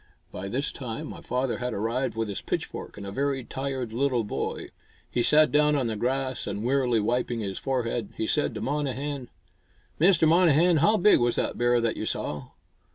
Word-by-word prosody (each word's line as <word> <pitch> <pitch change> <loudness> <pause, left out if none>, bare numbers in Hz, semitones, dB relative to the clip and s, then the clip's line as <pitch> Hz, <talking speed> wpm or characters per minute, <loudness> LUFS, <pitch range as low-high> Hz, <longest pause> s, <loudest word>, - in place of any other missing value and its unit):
By 95 +2 -6
this 135 +7 -2
time 115 -4 -6
my - - -9
father 125 0 -2
had 125 0 -3
arrived 115 +6 -1
with 115 0 -1
his 100 - -4
pitchfork - - -4
and 100 - -7
a 100 - -5
very 135 +3 -1
tired 130 -2 -4
little 125 -1 +1
boy. 105 - -4 0.4
He 120 - +1
sat 150 +5 +5
down 150 0 +4
on 135 -3 +1
the 115 -1 -1
grass, 130 +3 -2
and, 100 +1 -3
wearily 125 -2 +2
wiping 120 +2 -1
his 95 -2 -4
forehead, 120 -5 -2
he 110 - -1
said 150 +6 0
to - - -4
Monnehan, 140 -1 -3 0.7
"Mr. 165 -1 +5
Monnehan, 170 0 +5
how 210 +9 +4
big 210 +2 +5
was 120 -1 +1
the - - 0
bear 120 0 +2
that 115 -1 0
you - - -3
saw?" 75 -3 -3
125 Hz, 190 wpm, -26 LUFS, 115-145 Hz, 0.7 s, sat